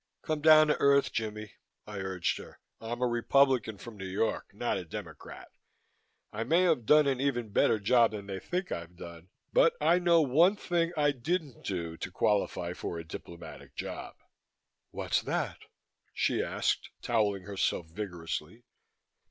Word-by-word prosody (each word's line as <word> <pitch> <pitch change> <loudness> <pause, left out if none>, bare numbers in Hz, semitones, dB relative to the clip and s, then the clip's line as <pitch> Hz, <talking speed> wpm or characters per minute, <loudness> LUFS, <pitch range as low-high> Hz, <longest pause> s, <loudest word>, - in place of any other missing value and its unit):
"Come 155 -1 -2
down 155 0 +8
to 150 - +1
earth, 140 0 +4
Jimmie," 110 -2 -4 0.3
I 105 -1 -7
urged 95 -2 -2
her. - - -12 0.2
"I'm 120 +2 -4
a - - +3
Republican 120 -2 +2
from 115 +1 -10
New 95 -1 -6
York; 100 +4 -1
not - - -2
a - - -6
Democrat. - - -9 0.8
I 110 +2 -2
may 165 +9 +3
have 155 -11 +1
done 150 0 +6
an 135 -2 0
even 120 -5 -1
better 110 - +3
job 115 +3 +4
than 105 -2 -7
they 95 -1 -5
think 180 - -3
I've 85 +1 -5
done, 85 0 -11 0.2
but - - +5
I 175 - +4
know 170 -1 +4
one 165 +9 +4
thing 175 -4 0
I 145 -1 +3
didn't 145 +2 -3
do 85 -4 -4
to - - -5
qualify 90 -3 0
for 85 - -5
a 85 - -5
diplomatic 85 0 -10
job." - - -6 0.7
"What's - - -1
that?" - - -2 0.6
she - - +1
asked, - - -1
towelling 105 -5 +1
herself 95 -3 -1
vigorously. 85 +3 -6
115 Hz, 160 wpm, -30 LUFS, 95-145 Hz, 0.8 s, down